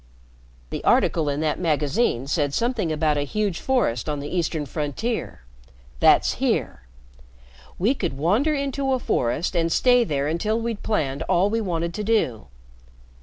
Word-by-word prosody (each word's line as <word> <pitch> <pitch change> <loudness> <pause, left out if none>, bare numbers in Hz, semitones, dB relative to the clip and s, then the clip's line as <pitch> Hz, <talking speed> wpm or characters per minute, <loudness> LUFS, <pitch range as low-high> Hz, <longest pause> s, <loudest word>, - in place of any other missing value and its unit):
"The - - -4
article 155 -3 +2
in 145 +1 -2
that 155 -1 -1
magazine 150 - 0
said 145 -1 0
something 230 -8 0
about 155 -1 +1
a - - 0
huge 195 +5 -2
forest 195 - 0
on 150 -1 -2
the 145 +5 -5
eastern 160 -3 -1
frontier. 150 - -3 0.6
That's - - +4
here. 60 - -1 0.9
We 215 +9 +2
could 135 - -3
wander 215 - +2
into 275 -1 -1
a - - +2
forest 160 - -1
and 165 -1 +1
stay 245 +4 +4
there 145 -8 -1
until 210 +8 0
we'd 230 -2 -3
planned 140 -9 -1
all 190 +4 +3
we 225 0 0
wanted 170 -4 -2
to 210 - -4
do. 135 - 0
170 Hz, 155 wpm, -23 LUFS, 145-225 Hz, 0.9 s, That's